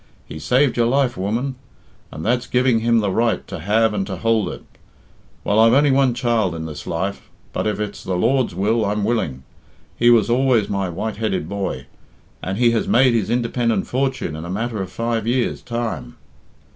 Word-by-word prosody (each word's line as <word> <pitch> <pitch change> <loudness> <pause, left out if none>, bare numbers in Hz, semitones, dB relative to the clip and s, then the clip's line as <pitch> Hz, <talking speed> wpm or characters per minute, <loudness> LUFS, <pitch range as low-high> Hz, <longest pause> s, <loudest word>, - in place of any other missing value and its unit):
He 80 - -8
saved 125 - +2
your 120 -1 +3
life, 130 0 +1
woman, 115 +8 -2 0.5
and 80 - -7
that's 125 +2 +1
giving 125 -2 +2
him 115 0 +2
the 100 -2 0
right 115 +3 0
to - - -6
have 105 +5 +2
and 95 -2 -2
to 95 -3 -4
hould 115 -1 +1
it. - - -8 0.8
Well, 105 +2 +2
I've 115 +1 +6
only 145 0 +4
one 135 -2 +3
child 115 -7 0
in 80 0 -5
this 75 -2 -8
life, 95 +4 -3 0.2
but, - - -1
if 105 -1 -1
it's 105 -1 -5
the 95 - -2
Lord's 125 +1 +1
will, 110 +4 +1
I'm 105 0 -1
willing. 100 - -1 0.5
He 120 - +4
was 115 -3 +5
always 120 -2 +2
my 100 -2 -1
white 105 +5 -4
headed 105 -7 -1
boy, 100 +1 -4 0.6
and 95 +1 -3
he 120 0 +4
has 115 - 0
made 130 0 +4
his 110 -4 0
independent 120 -1 0
fortune 130 - -2
in 80 - -6
a 85 - -7
matter 110 +2 -2
of 95 -1 -6
five 115 0 -2
years' 125 +1 0
time." 115 - -4
115 Hz, 195 wpm, -21 LUFS, 100-120 Hz, 0.8 s, I've